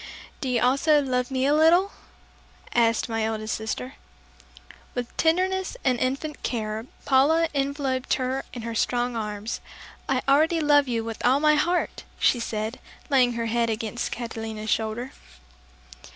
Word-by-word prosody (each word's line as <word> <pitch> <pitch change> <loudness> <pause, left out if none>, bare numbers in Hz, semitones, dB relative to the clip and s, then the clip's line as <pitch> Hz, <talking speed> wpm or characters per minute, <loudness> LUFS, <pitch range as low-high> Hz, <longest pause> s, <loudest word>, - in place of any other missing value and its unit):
"Do 265 - -2
you 245 -2 +2
also 280 +4 +4
love 250 -2 -1
me 260 -1 0
a 285 - +3
little?" 340 +6 +5 0.8
asked 230 -1 +2
my 225 -1 -1
eldest 220 0 -2
sister. 170 - -4 1.0
With 245 -1 -4
tenderness 375 +6 +1
and 250 -2 +2
infinite 275 +4 -2
care 220 -1 -3 0.2
Paula 305 +5 +4
enveloped 275 -2 0
her 260 +1 -2
in 240 - -7
her 230 0 -4
strong 245 +2 0
arms. 210 0 -4 0.5
"I 260 -1 +1
already 315 +4 +4
love 290 -2 +4
you 230 -2 -1
with 225 -1 -6
all 260 +3 +4
my 305 0 +4
heart!" 345 +4 0
she 245 - +3
said, 220 +1 -3 0.3
laying 250 -3 +4
her 230 0 -2
head 230 0 +1
against 225 +2 -3
Catalina's 225 -2 -5
shoulder. 225 +3 -1
250 Hz, 145 wpm, -25 LUFS, 225-285 Hz, 1.0 s, little